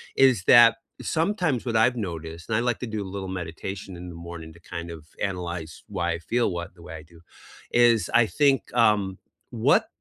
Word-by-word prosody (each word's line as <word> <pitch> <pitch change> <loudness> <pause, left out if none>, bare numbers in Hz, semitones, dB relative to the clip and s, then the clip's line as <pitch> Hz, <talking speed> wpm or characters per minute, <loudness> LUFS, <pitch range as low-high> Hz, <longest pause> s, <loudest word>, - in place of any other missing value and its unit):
is 130 -8 +4
that 120 -2 +8 0.2
sometimes, 165 - 0
what 115 -2 -2
I've 125 +3 +4
noticed- 85 -4 -6
and 110 - +1
I - - +1
like 120 -1 0
to 125 - -3
do 105 - -2
a 95 0 -8
little 95 -1 -5
meditation 90 +3 -7
in 90 +1 -8
the - - -9
morning 80 -2 -8
to 85 - -17 0.2
kind 85 0 -5
of 80 -2 -9 0.3
analyze 85 -3 -6
why 85 0 -2
I 85 - -4
feel 115 +4 0
what 85 +2 -6
the 85 - -16
way 90 -1 -9
I 75 - -10
do- 85 - -17 0.5
is 120 -2 +4
I 120 - +6
think, 140 0 +2
um, 105 -5 +3 0.3
what - - +3
95 Hz, 205 wpm, -25 LUFS, 85-120 Hz, 0.5 s, that